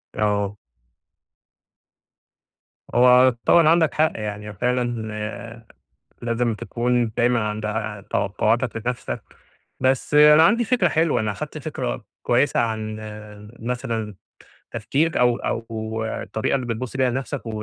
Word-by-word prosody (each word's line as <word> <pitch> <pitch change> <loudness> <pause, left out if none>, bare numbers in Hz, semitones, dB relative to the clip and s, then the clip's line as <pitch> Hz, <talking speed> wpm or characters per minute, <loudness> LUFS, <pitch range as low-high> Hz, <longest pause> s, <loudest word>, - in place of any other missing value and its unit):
آه. 105 -1 0 2.4
هو 125 +1 +6
طبعًا 170 -2 +6
عندك 165 -1 +3
حق، 155 +1 +2
يعني 105 -1 -5
فعلًا 115 -1 -3 0.6
لازم 115 0 0
تكون 120 +1 -1
دايمًا 120 0 +3
عند 105 0 -4
ع 105 -1 -3
توقعاتك 110 +4 -1
لنفسك، 125 -1 -3 0.6
بس 130 +2 +1
أنا 150 +1 +8
عندي 230 +8 +4
فكرة 225 -6 +2
حلوة، 160 0 +1
أنا 110 -1 -1
خدت 95 - -6
فكرة - - -4 0.2
كويّسة - - +2
عن 110 -2 -2 0.6
مثلًا 115 -3 -3 0.6
تفكير 140 +9 0
أو 120 -1 +3
أو 110 -1 -4
الطريقة 110 +2 -2
اللي 130 -2 -2
بتبص 120 +2 -4
بيها 130 -1 +3
لنفسك 135 +2 -4
و - - -5
120 Hz, 115 wpm, -22 LUFS, 110-130 Hz, 2.4 s, أنا